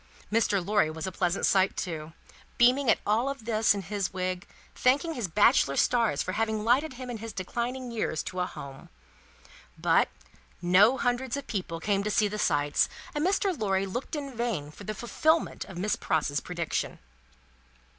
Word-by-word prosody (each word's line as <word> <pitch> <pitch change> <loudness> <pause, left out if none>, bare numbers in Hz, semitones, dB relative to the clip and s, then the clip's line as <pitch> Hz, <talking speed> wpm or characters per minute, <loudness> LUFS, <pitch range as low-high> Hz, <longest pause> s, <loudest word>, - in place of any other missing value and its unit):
Mr. 205 -4 +2
Lorry 205 -5 +2
was 160 0 -5
a 190 - -3
pleasant 175 +1 0
sight 190 0 +3
too, 160 -3 -4 0.4
beaming 250 +2 +4
at - - +5
all 230 +6 +2
this 220 -3 +2
in 200 - -4
his 200 0 -2
little - - -20
wig, 185 +1 -5
and - - -25
thanking 285 +6 +3
his 240 -9 -2
bachelor 205 - +4
stars 230 - +2
for - - -3
having 220 +1 -1
lighted 260 +6 +2
him 255 0 -7
in 235 - -4
his 225 +1 -6
declining 240 +6 -4
years 215 -9 -2
to 185 - -5
a 180 - 0
Home. 135 -5 -10 0.9
But, - - +3 0.5
no 190 +9 +5
Hundreds 245 +1 -1
of 280 - -6
people 180 -8 -4
came 200 +3 +1
to 210 - -1
see 210 0 +3
the 210 +1 -5
sights, 145 -5 +2 0.2
and 295 - -1
Mr. 385 +1 +1
Lorry 195 -6 0
looked 245 - -4
in 280 -3 -5
vain 220 -12 -2
for 200 - -12
the 215 - -4
fulfilment 315 +9 0
of 190 - -10
Miss 205 +4 0
Pross's 145 -3 0
prediction. 170 -3 -3
210 Hz, 180 wpm, -28 LUFS, 180-245 Hz, 0.9 s, at